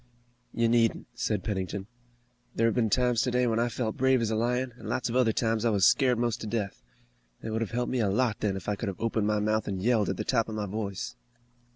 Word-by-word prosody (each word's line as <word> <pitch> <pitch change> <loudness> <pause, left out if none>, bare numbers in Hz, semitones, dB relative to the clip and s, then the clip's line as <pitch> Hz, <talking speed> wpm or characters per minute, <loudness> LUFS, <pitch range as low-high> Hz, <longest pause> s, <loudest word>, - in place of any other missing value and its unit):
"You 115 0 +1
needn't," 115 -1 +2
said 110 -5 -1
Pennington. 95 -2 -3 0.7
"There 115 - +2
have 115 - +3
been 115 -3 +1
times 125 0 +2
today 125 0 +1
when 115 -1 +1
I 120 +1 +1
felt 115 -2 -3
brave 130 0 +3
as 115 -1 -1
a - - +1
lion, 125 +2 0
and - - -7
lots 125 - -1
of 115 - -3
other 125 -3 +4
times 110 0 0
I 120 - +3
was 100 -4 +3
scared 130 -4 +4
most 120 -1 -1
to 110 - -5
death. 105 -3 -3 0.6
It 110 - -4
would 110 +1 -1
have 115 - -1
helped 120 +1 -2
me 130 - 0
a 105 -4 +2
lot 115 +1 +1
then, 100 -2 0
if 95 - -9
I 105 - 0
could 105 - -4
have 95 - -4
opened 110 -2 0
my 105 0 +1
mouth 110 +1 0
and 95 -2 -2
yelled 110 0 +2
at 95 - -2
the - - -2
top 115 -3 +1
of 110 - -5
my 105 -1 -2
voice." 100 -1 -4
115 Hz, 255 wpm, -28 LUFS, 105-120 Hz, 0.7 s, other